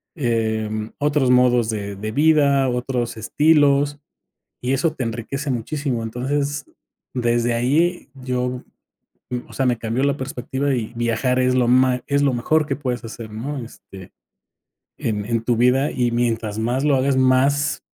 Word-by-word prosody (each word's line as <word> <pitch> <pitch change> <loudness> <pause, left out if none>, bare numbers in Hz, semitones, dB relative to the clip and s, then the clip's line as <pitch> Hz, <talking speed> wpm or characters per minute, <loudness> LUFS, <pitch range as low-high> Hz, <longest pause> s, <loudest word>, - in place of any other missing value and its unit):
eh, 110 -6 0
mm, 110 0 -4
otros 145 -2 +2
modos 125 -2 +4
de 100 -2 -3
de 110 +2 -5
vida, 140 -1 +3
otros 125 -1 -2
estilos, 145 +3 +3 0.6
y 125 - -1
eso 150 +4 +1
te 135 - -4
enriquece 120 +5 -3
muchísimo. 130 +1 -2
Entonces, 140 +5 -2 0.5
desde 120 -1 +1
ahí 150 +10 +1
yo, 125 -1 -3 0.8
o - - -14
sea, 135 - 0
me 125 -2 +2
cambió 115 +3 -2
la 140 0 +1
perspectiva 130 +1 -2
y 115 -2 -4
viajar 120 +2 0
es 130 0 +2
lo 125 -2 +2
ma 125 0 +3
es 140 0 +1
lo 140 -2 +2
mejor 150 +6 +1
que 140 - -1
puedes 125 -4 -3
hacer, 115 -1 -8
¿no?, 130 +7 -5
este, 95 -5 -13 0.9
en 105 -2 -2
en 115 0 -1
tu 120 0 +1
vida 125 +4 +3
y 120 -1 0
mientras 115 -3 -1
más 120 +4 0
lo 145 -2 +3
hagas, 135 +1 +2
más, 135 +3 +2
125 Hz, 155 wpm, -21 LUFS, 115-140 Hz, 0.9 s, modos